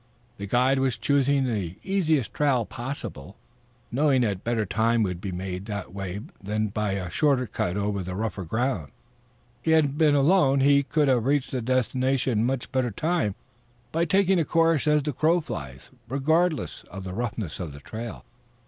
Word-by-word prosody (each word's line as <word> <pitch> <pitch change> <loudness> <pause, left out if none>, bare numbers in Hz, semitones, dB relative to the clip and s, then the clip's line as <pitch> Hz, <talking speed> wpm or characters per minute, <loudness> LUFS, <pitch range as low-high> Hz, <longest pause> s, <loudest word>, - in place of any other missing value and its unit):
The 100 - -5
guide 130 +5 +3
was 130 -3 +1
choosing 140 +3 +2
the 100 -9 -2
easiest 160 - +1
trail 135 -6 +2
possible, 115 - -7 0.6
knowing 135 +1 +3
that 100 -5 -1
better 115 -2 0
time 110 +4 +2
would 90 -3 -3
be 95 - -4
made 90 +1 -5
that 105 -4 -5
way 95 0 -5 0.2
than 105 +2 -1
by 105 0 -1
a 95 -2 -3
shorter 135 - +2
cut 90 -4 -2
over 100 0 -1 0.2
rougher 105 -2 -3
ground. 110 - -1 0.7
Had 160 -1 +4
he 140 - -2
been 150 0 +3
alone 140 -1 +4
he 140 +1 +5
could 150 +1 +1
have 125 -2 +2
reached 140 -1 +1
his 130 - -2
destination 130 0 +1
in 115 - +2
much 130 -1 -3
better 130 -2 +1
time 155 - -1 0.6
by 165 +1 +1
taking 190 +1 +3
a - - +3
course 165 -1 +2
as 150 -1 +3
the 150 0 -2
crow 160 +7 +3
flies, 65 - -7 0.2
regardless 155 +4 +1
of 95 +1 -7
the 95 -1 -6
roughness 115 -6 -3
of 85 -5 -4
the 70 - -10
trail. 110 - -7
125 Hz, 175 wpm, -26 LUFS, 100-145 Hz, 0.7 s, he